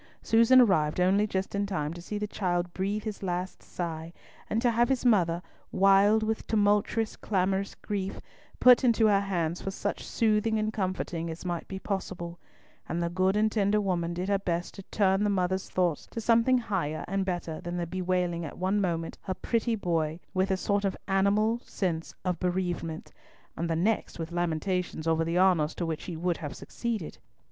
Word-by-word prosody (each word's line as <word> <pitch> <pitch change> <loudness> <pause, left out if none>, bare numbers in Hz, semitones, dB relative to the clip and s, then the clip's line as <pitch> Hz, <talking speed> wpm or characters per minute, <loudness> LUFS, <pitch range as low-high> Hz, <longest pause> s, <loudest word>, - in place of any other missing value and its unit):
Susan 230 +3 +6
arrived 160 -10 +3
only 195 +4 +3
just 190 -1 -2
in 200 0 0
time 155 -5 -2
to 175 - -9
see 210 +4 -5
the 210 - -2
child 175 -4 -2
breathe 200 +3 -2
his 215 -2 -5
last 180 -1 -3
sigh, 165 -2 -5 0.4
and 220 - +1
to 240 0 +3
have 235 +2 +2
his 260 -2 0
mother, 175 -7 +3 0.3
wild 195 +3 +5
with 220 0 -2
tumultuous 210 +1 +2
clamorous 195 0 -1
grief, 195 -2 -4 0.4
put 250 0 +7
into 230 -2 +4
her 205 -2 +5
hands 175 -4 -1
for - - -3
such 200 +1 -3
soothing 220 0 +1
and 215 0 -1
comforting 185 -4 -2
as 165 +3 -7
might 175 -2 -3
be 190 - -5
possible, 180 -3 -4 0.5
and 170 - -1
the 170 0 -1
good 185 +2 +2
and 215 +1 +3
tender 210 -1 +2
woman 175 -4 -1
did 180 +2 -3
her 200 -1 +2
best 175 -2 -2
to 195 - -9
turn 195 -1 +2
the 210 - +2
mother's 190 -1 0
thoughts 175 -5 0
to - - -6
something 230 +3 +4
higher 190 -10 -2
and 195 0 0
better 175 -4 -3
than 175 +1 -4
the 175 - -1
bewailing 180 -1 -1
at 155 - -7
one 190 +3 +1
moment 165 -3 -2
"her 185 - -4
pretty 230 +2 0
boy," 165 -5 -1
with 190 +1 +1
a 190 - +1
sort 200 +2 0
of 195 -1 -1
animal 205 +4 +2
sense 165 -4 -3
of 180 -1 -1
bereavement, 175 -3 -2 0.4
and 170 +1 -2
the 165 - +1
next 205 +7 0
with 165 0 -5
lamentations 175 0 -1
over 165 0 +2
the 165 +2 -1
honours 180 -5 +3
to 175 - -2
which 160 -2 -4
he 170 -3 -5
would 175 +1 0
have 145 -4 -6
succeeded. 225 -9 -4
190 Hz, 190 wpm, -28 LUFS, 175-210 Hz, 0.5 s, put